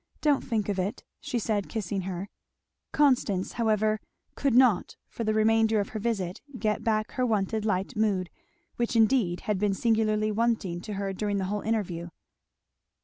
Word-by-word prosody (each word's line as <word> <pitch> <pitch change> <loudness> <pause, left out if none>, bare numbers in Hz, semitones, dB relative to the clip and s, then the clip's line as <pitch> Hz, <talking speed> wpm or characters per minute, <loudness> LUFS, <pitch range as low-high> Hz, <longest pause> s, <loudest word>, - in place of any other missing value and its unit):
Don't 295 -3 +3
think 220 -5 -1
of 200 -2 -1
it," 200 +7 -2 0.2
she 285 -4 -3
said 210 -3 -1
kissing 200 -3 -2
her. 185 +2 -4 0.6
Constance 245 -10 +2
however 215 -2 +1 0.3
could 275 -4 0
not 245 -7 +4
for 230 - -5
the 215 - +1
remainder 220 0 +3
of 200 - -2
her 220 - -5
visit 195 -5 -2 0.2
get 215 -2 -1
back 215 -1 0
her 255 - -1
wonted 215 -2 0
light 190 -2 -1
mood, 200 -5 0 0.5
which 235 0 -1
indeed 220 -6 +3
had 210 -3 -1
been 205 -1 +1
singularly 215 -1 +1
wanting 215 -6 0
to 210 +2 -6
her 195 -1 -2
during 205 +1 -1
the 190 - -1
whole 210 - -2
interview. 180 -6 -2
215 Hz, 165 wpm, -28 LUFS, 195-225 Hz, 0.6 s, not